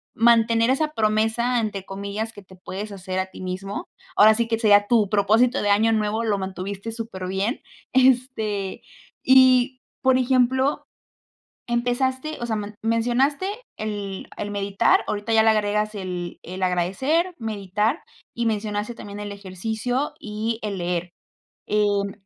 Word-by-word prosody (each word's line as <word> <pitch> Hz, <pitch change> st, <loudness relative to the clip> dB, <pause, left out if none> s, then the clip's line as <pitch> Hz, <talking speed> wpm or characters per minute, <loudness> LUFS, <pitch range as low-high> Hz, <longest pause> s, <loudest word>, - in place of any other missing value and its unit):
mantener 230 Hz, +1 st, +4 dB
esa 305 Hz, +3 st, 0 dB
promesa 225 Hz, +2 st, +1 dB
entre 205 Hz, -4 st, -3 dB
comillas 200 Hz, +3 st, -5 dB
que 205 Hz, -, -11 dB
te 185 Hz, 0 st, -16 dB
puedes 195 Hz, +3 st, -7 dB
hacer 185 Hz, -1 st, -4 dB
a 190 Hz, -, -1 dB
ti 185 Hz, -, -11 dB
mismo. 190 Hz, +2 st, -4 dB, 0.3 s
Ahora 215 Hz, +1 st, +7 dB
sí 230 Hz, +1 st, 0 dB
que 225 Hz, -, 0 dB
sería 205 Hz, -2 st, +5 dB
tu 220 Hz, -5 st, +3 dB
propósito 220 Hz, +5 st, +3 dB
de 205 Hz, -, 0 dB
año 220 Hz, +3 st, +4 dB
nuevo, 215 Hz, +1 st, 0 dB
lo 205 Hz, -3 st, 0 dB
mantuviste 195 Hz, +3 st, -5 dB
superbién, 200 Hz, 0 st, -3 dB, 0.3 s
este 245 Hz, -6 st, +1 dB, 0.5 s
y 255 Hz, -1 st, +6 dB, 0.2 s
por 260 Hz, -1 st, +4 dB
ejemplo, 260 Hz, +2 st, +2 dB, 0.8 s
empezaste 260 Hz, +5 st, -1 dB
o 240 Hz, -, -2 dB
sea 220 Hz, -2 st, -1 dB
man 210 Hz, 0 st, -5 dB
mencionaste 245 Hz, +8 st, +1 dB, 0.3 s
el 205 Hz, -3 st, -5 dB
el 205 Hz, -, -3 dB
meditar, 200 Hz, -1 st, +2 dB
ahorita 210 Hz, +2 st, -2 dB
ya 220 Hz, -, +6 dB
le 225 Hz, -, +5 dB
agregas 210 Hz, 0 st, 0 dB
el 180 Hz, -3 st, -5 dB
el 185 Hz, +2 st, -7 dB
agradecer, 230 Hz, -, +1 dB
meditar 215 Hz, -, -1 dB, 0.3 s
y 235 Hz, 0 st, -1 dB
mencionaste 210 Hz, +1 st, -2 dB
también 205 Hz, -2 st, -8 dB
el 205 Hz, 0 st, -5 dB
ejercicio 220 Hz, +7 st, -3 dB
y 220 Hz, +2 st, -3 dB
el 200 Hz, -3 st, -3 dB
leer. 175 Hz, 0 st, -2 dB, 0.6 s
Em, 205 Hz, -1 st, +1 dB
215 Hz, 145 wpm, -23 LUFS, 200-240 Hz, 0.8 s, Ahora